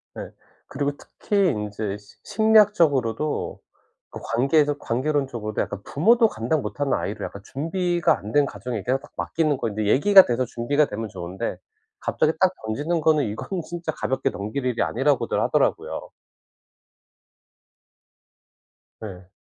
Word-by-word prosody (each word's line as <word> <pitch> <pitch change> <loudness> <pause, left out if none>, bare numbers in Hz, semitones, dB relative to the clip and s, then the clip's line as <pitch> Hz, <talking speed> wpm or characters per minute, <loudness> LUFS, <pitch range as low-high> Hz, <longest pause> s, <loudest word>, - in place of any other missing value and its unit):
네. - - -7 0.4
그리고 145 +1 -2
특히 200 -3 0
인제 105 -4 -3
시 100 -1 -19
심리학적으로도 175 - +2 0.5
그 - - -8
관계에서 145 +4 +2
관계론적으로도 130 -4 -1
약간 100 -1 -4
부모도 225 - +4
감당 135 - -1
못하는 145 0 -2
아이를 105 +2 -2
약간 100 - -9
준비가 175 +4 0
안 105 - -8
된 145 +3 +4
가정에게 120 -5 -5
딱 140 - -17
맡기는 140 - 0
거 115 - -2
이제 105 0 -3
얘기가 190 - +7
돼서 125 +1 0
준비가 135 +6 +1
되면 110 -2 -5
좋은데 90 -1 -5 0.4
갑자기 155 - +1
딱 185 -1 +4
던지는 150 +10 -1
거는 155 -2 +3
이거는 115 - -4
진짜 170 -1 -4
가볍게 130 -2 -1
넘길 110 +7 -4
일이 125 -2 0
아니라고들 135 +3 +1
하더라고요. - - 0 2.9
예. 95 -4 -9
135 Hz, 320 characters per minute, -24 LUFS, 110-160 Hz, 2.9 s, 얘기가